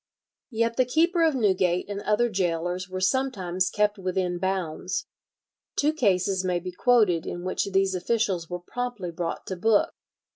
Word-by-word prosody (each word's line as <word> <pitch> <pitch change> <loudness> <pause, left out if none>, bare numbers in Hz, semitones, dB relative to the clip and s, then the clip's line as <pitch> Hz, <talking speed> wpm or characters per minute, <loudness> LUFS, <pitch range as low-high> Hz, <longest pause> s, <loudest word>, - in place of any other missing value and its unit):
Yet 230 -1 0
the 255 - +4
keeper 335 +7 +2
of 320 -3 +3
Newgate 185 -6 +1
and 200 0 -4
other 210 +4 +2
gaolers 180 -2 -1
were 185 0 -4
sometimes 190 -6 0
kept 210 0 +1
within 185 -1 -1
bounds. 185 -1 -2 0.7
Two 300 +2 +2
cases 195 - +1
may 180 -1 0
be 180 +1 -6
quoted 205 -5 +3
in 175 - -5
which 185 - -1
these 195 0 +2
officials 185 -2 -1
were 180 - -3
promptly 240 -3 -4
brought 170 0 -4
to 190 - -4
book. 210 +3 +2
190 Hz, 155 wpm, -26 LUFS, 180-230 Hz, 0.7 s, the